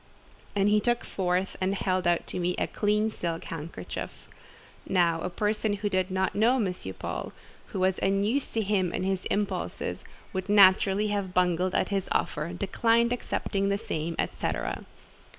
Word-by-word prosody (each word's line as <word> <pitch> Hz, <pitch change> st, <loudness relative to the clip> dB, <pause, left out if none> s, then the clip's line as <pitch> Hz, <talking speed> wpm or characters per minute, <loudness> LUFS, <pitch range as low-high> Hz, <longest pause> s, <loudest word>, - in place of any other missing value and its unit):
And 200 Hz, 0 st, +3 dB
he 210 Hz, +1 st, +5 dB
took 240 Hz, +3 st, +1 dB
forth 185 Hz, 0 st, -1 dB
and 190 Hz, +1 st, +1 dB
held 185 Hz, -1 st, 0 dB
out 175 Hz, -1 st, +2 dB
to -, -, -4 dB
me 180 Hz, 0 st, 0 dB
a -, -, +1 dB
clean 210 Hz, +1 st, +1 dB
silk 170 Hz, -4 st, -3 dB
handkerchief. 155 Hz, -, -7 dB, 0.6 s
Now 170 Hz, -3 st, +3 dB
a 180 Hz, -, -2 dB
person 210 Hz, +3 st, 0 dB
who 205 Hz, 0 st, -1 dB
did 185 Hz, -1 st, 0 dB
not 190 Hz, 0 st, 0 dB
know 230 Hz, +5 st, +4 dB
M. 205 Hz, -8 st, +1 dB, 0.2 s
Paul, -, -, -4 dB, 0.3 s
who 190 Hz, -, -4 dB
was 185 Hz, 0 st, +2 dB
unused 200 Hz, +8 st, +1 dB
to 225 Hz, -, +2 dB
him 190 Hz, -3 st, +1 dB
and 185 Hz, -, -1 dB
his 190 Hz, -1 st, -1 dB
impulses, 205 Hz, 0 st, -2 dB, 0.3 s
would 190 Hz, +1 st, -3 dB
naturally 200 Hz, +1 st, +5 dB
have 200 Hz, -3 st, -2 dB
bungled 180 Hz, 0 st, +2 dB
at -, -, +1 dB
this 195 Hz, -2 st, -1 dB
offer—declined 205 Hz, +9 st, +1 dB
accepting 200 Hz, -4 st, -1 dB
the 200 Hz, -, +1 dB
same—et 165 Hz, -3 st, -3 dB
cetera. -, -, -2 dB
195 Hz, 160 wpm, -28 LUFS, 180-210 Hz, 0.6 s, he